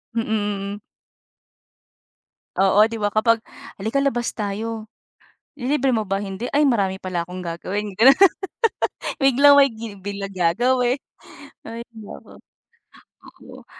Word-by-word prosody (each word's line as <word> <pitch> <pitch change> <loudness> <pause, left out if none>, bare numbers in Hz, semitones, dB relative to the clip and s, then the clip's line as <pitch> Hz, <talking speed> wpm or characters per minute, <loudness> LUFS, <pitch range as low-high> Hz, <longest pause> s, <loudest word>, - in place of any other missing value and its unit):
Mm, 230 - +1 0.5
mm. 205 - -11 1.8
Oo, 195 +2 +4
'di 230 - -5
ba, 205 -1 -1
kapag, 230 +1 +3 0.4
"Halika, 220 +8 -1
labas 240 -4 -1
tayo." 215 +1 -4 0.7
"Lilibre 265 0 +1
mo 220 -3 -1
ba?" 195 +1 -1
"Hindi." 200 +5 -5
"Ay, 295 - +4
marami 200 -8 +1
pala 185 -3 -4
akong 180 +1 -7
gagawin." 195 +5 -4
Gano'n. 250 +8 +6 1.1
Biglang 275 +2 +6
may 275 0 +6
gi 225 -2 -8
bigla 200 +1 -5
gagawi 240 +8 +1 0.7
Hay, 230 +1 -8
naku. 215 -2 -12 0.8
Oo, - - -15
220 Hz, 115 wpm, -22 LUFS, 195-245 Hz, 1.8 s, Gano'n